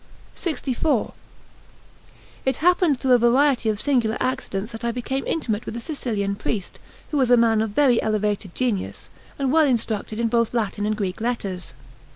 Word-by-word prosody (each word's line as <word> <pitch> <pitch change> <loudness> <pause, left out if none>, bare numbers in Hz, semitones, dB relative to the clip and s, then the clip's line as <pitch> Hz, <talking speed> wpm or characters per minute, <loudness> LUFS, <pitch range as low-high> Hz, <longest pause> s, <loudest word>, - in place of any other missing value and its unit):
LXIV 290 - -1 1.3
IT 265 - +1
happened 350 -5 +3
through 265 -1 0
a 245 - +7
variety 245 0 +3
of 210 -1 -1
singular 240 -6 +1
accidents 235 -5 -2
that 225 0 -8
I 235 - 0
became 255 +3 -3
intimate 225 -9 -2
with 230 - -4
a - - -3
Sicilian 225 -8 -2
priest, 205 -1 -4 0.3
who 300 - 0
was 260 -3 +2
a 245 - +6
man 225 -2 +3
of 220 - -1
very 245 +2 +3
elevated 210 -3 -1
genius 235 -7 -2 0.3
and 270 -2 0
well 315 0 +5
instructed 220 -3 -1
in 235 - +2
both 230 0 +1
Latin 210 -2 -1
and 215 0 -1
Greek 195 -1 -3
letters. 195 - -3
235 Hz, 170 wpm, -23 LUFS, 215-265 Hz, 1.3 s, a